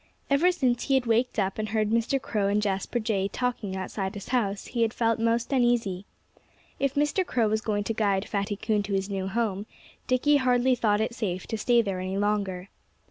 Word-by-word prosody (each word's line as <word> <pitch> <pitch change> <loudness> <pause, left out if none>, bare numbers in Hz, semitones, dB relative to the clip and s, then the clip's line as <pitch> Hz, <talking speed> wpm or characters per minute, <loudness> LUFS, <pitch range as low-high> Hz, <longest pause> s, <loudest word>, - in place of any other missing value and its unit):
Ever 325 +6 +4
since 255 -9 0
he 270 - +2
had 260 -2 +2
waked 235 +2 +1
up 195 0 -1
and 215 0 -2
heard 215 -1 0
Mr. 230 +4 +1
Crow 210 -6 -1
and 205 +1 +2
Jasper 200 +3 -1
Jay 210 -4 0
talking 235 -4 -3
outside 190 +1 -4
his 200 - -8
house 210 -6 0
he 240 - -3
had 225 0 +1
felt 230 -1 +1
most 230 +3 0
uneasy. 235 -7 +1 0.7
If 275 -1 0
Mr. 295 +6 +2
Crow 240 -10 +1
was 220 +1 0
going 205 -1 -1
to 225 - -2
guide 200 -2 0
Fatty 205 0 -2
Coon 215 0 0
to 200 0 -4
his 195 +1 -1
new 190 -1 -2
home, 205 -1 -2 0.4
Dickie 285 +4 +3
hardly 255 -1 +3
thought 215 -3 +2
it 225 +2 -1
safe 190 -6 -3
to - - -4
stay 235 +2 +3
there 195 -3 -3
any 185 +1 -3
longer. 200 -2 -1
220 Hz, 205 wpm, -27 LUFS, 200-245 Hz, 0.7 s, Ever